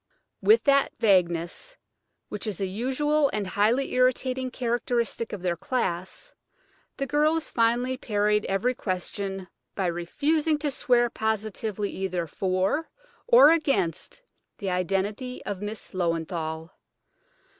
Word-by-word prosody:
With 440 +2 +5
that 280 -1 +3
vagueness 180 - +1 0.5
which 210 +2 -5
is 205 -5 -3
a 195 - 0
usual 265 +9 +1
and 210 -2 -1
highly 215 +8 +1
irritating 255 0 +1
characteristic 240 -2 -1
of 200 -3 -6
their 175 -2 0
class, 190 - -3 0.6
the 275 - -1
girls 305 +3 +1
finally 240 +2 +1
parried 210 -2 +1
every 210 +6 0
question 195 -1 -4 0.3
by 195 - -1
refusing 295 - 0
to 295 -1 -2
swear 240 -2 +2
positively 215 -1 -2
either 185 -3 -2
for 190 - -1 0.4
or 485 -8 +8
against 295 - 0 0.3
the 195 -4 -3
identity 195 +7 -2
of 200 -2 -4
Miss 210 +1 -5
Löwenthal. 165 -2 -2
215 Hz, 115 wpm, -26 LUFS, 185-260 Hz, 0.6 s, or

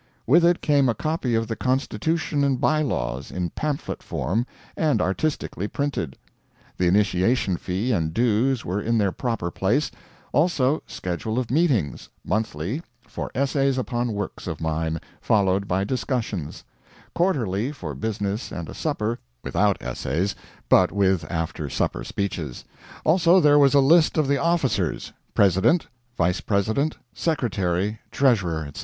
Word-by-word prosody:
With 165 +8 +5
it 175 +1 +4
came 140 -3 +3
a 115 - +1
copy 155 -6 -1
of 115 0 0
the 115 - -3
Constitution 140 +4 0
and 135 -3 +1
By 155 0 +2
Laws, 65 - -2
in 90 -2 -3
pamphlet 150 -2 -3
form, 115 +7 -2 0.3
and 155 -3 +2
artistically 100 - -1
printed. 140 - -3 0.6
The 90 - +2
initiation 100 +2 +2
fee 95 +8 -2
and 80 -8 0
dues 120 +5 +1
were 95 +4 -1
in 115 +2 +1
their 100 -3 +2
proper 115 -6 -2
place; 120 - +1 0.4
also, 150 -3 +2
schedule 90 +6 -3
of 125 -3 -1
meetings 130 - +1 0.2
monthly 110 - -2 0.3
for - - -5
essays 135 0 +1
upon 120 -2 -1
works 100 -2 -5
of - - -4
mine, 80 0 -1 0.2
followed 100 -2 +2
by 95 +2 +1
discussions; 110 - -3 0.5
quarterly 130 - 0
for 85 - -6
business 105 - -3
and 85 -2 -6
a - - -7
supper, 120 -7 -2 0.2
without 100 -1 +2
essays, 85 +10 -1 0.3
but - - +5
with 95 -3 +1
after 80 -3 -3
supper - - -1
speeches; 85 -10 -4 0.4
also 175 +2 +5
there 145 -3 +6
was 140 0 +5
a - - +7
list 160 +5 +5
of 155 -3 +2
the 140 0 +2
officers: 140 - 0 0.2
President, 100 - +4 0.3
Vice 90 +1 +1
President, 110 +9 0 0.2
Secretary, 105 - -1
Treasurer, 100 - +2
etc. 70 - -9
110 Hz, 140 wpm, -24 LUFS, 95-140 Hz, 0.6 s, a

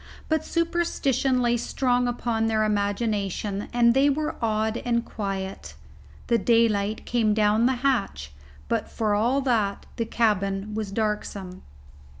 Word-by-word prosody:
But 315 -1 +1
superstition 280 -7 0
lay 240 0 +2
strong 245 +1 0
upon 235 -2 -1
their 220 -1 +1
imagination, 205 -1 -1
and 235 -1 +4
they 275 +3 +4
were 300 +2 -1
awed 220 0 0
and 235 -1 -1
quiet. 195 -2 -5 0.5
The 235 -1 +2
daylight 215 -2 +2
came 220 -3 +1
down 215 +2 +3
the 260 - +2
hatch, 195 - 0 0.4
but - - -1
for 215 -2 -1
all 240 +7 +2
that 220 -7 0
the 230 - -1
cabin 210 -3 0
was 215 -2 -3
darksome. 200 -3 -3
225 Hz, 135 wpm, -25 LUFS, 205-245 Hz, 0.5 s, and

